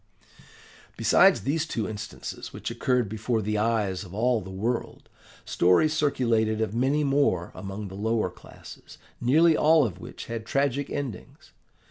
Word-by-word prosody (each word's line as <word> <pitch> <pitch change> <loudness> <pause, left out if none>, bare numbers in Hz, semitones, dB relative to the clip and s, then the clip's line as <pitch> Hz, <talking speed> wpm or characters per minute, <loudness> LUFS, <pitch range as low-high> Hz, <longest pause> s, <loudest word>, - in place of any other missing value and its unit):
"Besides - - +5
these 155 +4 -1
two 110 -8 -2
instances 105 - -7
which - - -6
occurred 125 -3 0
before 110 +3 -2
the 105 0 -1
eyes 105 -4 0
of 95 0 -11
all 120 +1 +1
the 95 - -9
world, 110 +6 -3 0.4
stories 90 - +3
circulated 115 -8 +1
of 110 -2 -1
many 135 +6 +1
more 135 -11 +1
among 100 +1 -6
the 95 - -10
lower 110 -1 -1
classes, - - -14 0.2
nearly 155 +7 +4
all 155 -1 +4
of 95 -5 -5
which - - -9
had 115 -1 -5
tragic 140 +1 0
endings. 135 -10 -7
115 Hz, 145 wpm, -26 LUFS, 105-140 Hz, 0.4 s, Besides